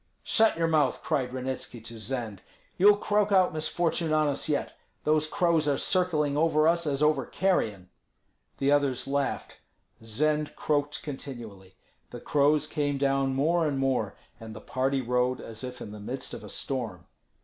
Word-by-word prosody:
"Shut 220 -5 +3
your 165 - +1
mouth!" 155 -2 +1
cried 135 -6 -1
Ranitski 130 -1 -5
to 115 0 -9
Zend. 110 -3 -4 0.3
"You'll 205 +2 +6
croak 205 0 +1
out 185 -4 +4
misfortune 160 +1 -1
on 155 -1 +3
us 145 +2 -2
yet. 145 - -1 0.3
Those 155 0 +2
crows 165 -2 +1
are 140 -2 +2
circling 155 -6 +1
over 155 0 +3
us 170 -1 +2
as 145 0 0
over 150 0 +3
carrion." 110 - 0 0.7
The 140 +1 +1
others 140 -3 +2
laughed. 140 0 -2 0.4
Zend 150 +7 0
croaked 145 -1 -1
continually. 115 -10 -8 0.3
The - - -8
crows 145 +1 +2
came 145 -2 -1
down 135 -1 +1
more 160 +4 +2
and 140 -2 -1
more, 130 -6 0 0.2
and 110 -1 -9
the - - -7
party 130 +3 -1
rode 125 +1 0
as 115 +2 -8
if 125 -1 -7
in 105 - -7
the 105 - -9
midst 130 +5 -5
of - - -7
a - - -9
storm. 115 -10 -3
140 Hz, 165 wpm, -28 LUFS, 125-155 Hz, 0.7 s, You'll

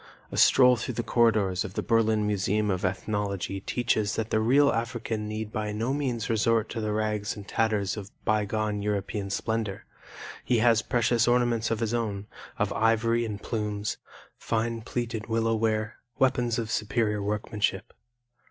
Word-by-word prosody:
A - - -5
stroll 125 -2 +6
through 120 +1 -4
the 120 - -1
corridors 110 -6 +2
of 95 - -8
the - - -1
Berlin 110 -2 +2
Museum 105 +1 +1
of 90 -1 -2
Ethnology 100 0 -2
teaches 110 0 0
that 110 0 -3
the 110 - +3
real 135 +6 +4
African 115 -2 -3
need 110 0 -5
by 105 -1 -2
no 115 +5 -1
means 125 -6 -2
resort 115 0 +2
to 115 - -4
the 110 0 -1
rags 105 +1 -1
and 100 -2 -10
tatters 105 -4 0
of 100 -1 -7 0.2
bygone 105 0 0
European 100 0 -2
splendor. 110 -1 -2 0.6
He 120 0 +2
has 115 -1 +4
precious 120 -1 +1
ornaments 120 -2 +2
of 115 0 -1
his 115 0 0
own, 105 -4 -2 0.3
of - - 0
ivory 115 +2 +2
and 105 -2 -5
plumes, 105 -2 -3 0.4
fine 115 0 -1
plaited 115 -1 -4
willow 115 0 +1
ware, 110 -1 0 0.2
weapons 125 -3 +2
of 115 -2 -3
superior 105 -1 0
workmanship. 105 -1 -2
110 Hz, 160 wpm, -27 LUFS, 105-115 Hz, 0.6 s, stroll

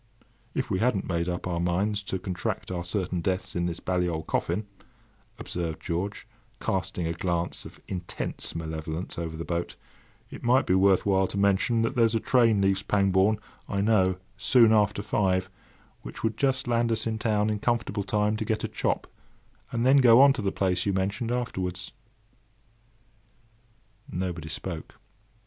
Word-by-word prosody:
"If - - -2
we 95 - +1
hadn't 115 -4 +1
made 85 -1 -1
up 90 0 -3
our 85 -1 -2
minds 95 +5 0
to 95 - -2
contract 90 -1 -4
our 90 -1 -3
certain 90 -1 -2
deaths 95 +2 -2
in 85 0 0
this 85 - -4
bally 90 -1 0
old 80 -1 -3
coffin," 95 +6 -1 0.7
observed 85 -3 -4
George, 90 +5 -4 0.3
casting 90 - -1
a 80 - -1
glance 85 -1 -2
of - - -11
intense 90 -2 -5
malevolence 80 +1 -4
over 80 -1 -4
the 85 - -5
boat, 85 0 -3 0.6
"it - - -9
might 125 +2 +3
be 90 - +2
worth 95 0 +4
while 95 -1 +3
to 100 - -5
mention 100 +4 +2
that 115 - -1
there's 115 -2 +3
a - - +3
train 115 -4 +3
leaves 95 0 +2
Pangbourne, 100 +1 +2 0.3
I 100 -1 0
know, 95 -4 +3 0.2
soon 115 -4 +5
after 105 -1 +2
five, 95 -2 0 0.5
which - - -9
would 110 -1 0
just 135 0 0
land 120 -1 +2
us 110 -1 0
in 110 -1 -2
town 105 -1 +1
in 105 - -2
comfortable 115 -2 0
time 105 +2 +1
to 110 - -2
get 110 0 -1
a - - 0
chop, - - -1 0.7
and 115 +1 0
then 135 +2 +6
go 125 -3 +7
on 140 0 +8
to 130 - -4
the 100 -1 0
place 95 -2 +1
you 100 - +2
mentioned 100 +5 -1
afterwards." 95 -7 -3 2.2
Nobody 90 -3 -3
spoke. 80 0 -5
95 Hz, 170 wpm, -27 LUFS, 90-110 Hz, 2.2 s, on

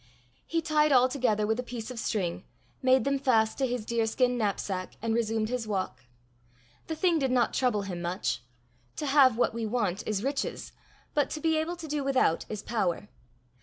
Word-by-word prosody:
He 330 0 0
tied 305 -1 +3
all 255 -1 +6
together 245 -6 +1
with 220 +2 0
a - - +2
piece 245 -1 -6
of 245 - -6
string, 185 -5 -2 0.4
made 260 0 +4
them 275 0 +1
fast 225 -4 +2
to 265 - +2
his 245 -3 -3
deerskin 235 +2 +1
knapsack, 200 -4 -2
and 225 0 -1
resumed 225 -1 0
his 245 -3 -2
walk. 190 -10 -3 0.8
The 320 - -3
thing 335 0 +2
did 270 -2 +1
not 245 -3 +2
trouble 240 -6 +1
him 180 -3 -5
much. 175 +2 -2 0.5
To 300 - -3
have 270 -4 +5
what 245 - +2
we 230 -1 -2
want 210 -4 -1
is 210 -1 -1
riches, 275 +1 -2 0.4
but 290 -2 +2
to 310 - -4
be 320 +1 +2
able 330 +3 -2
to 335 -2 -8
do 295 -1 -2
without 265 -11 +2
is 215 -1 -5
power. 205 -3 -1
240 Hz, 190 wpm, -29 LUFS, 215-275 Hz, 0.8 s, all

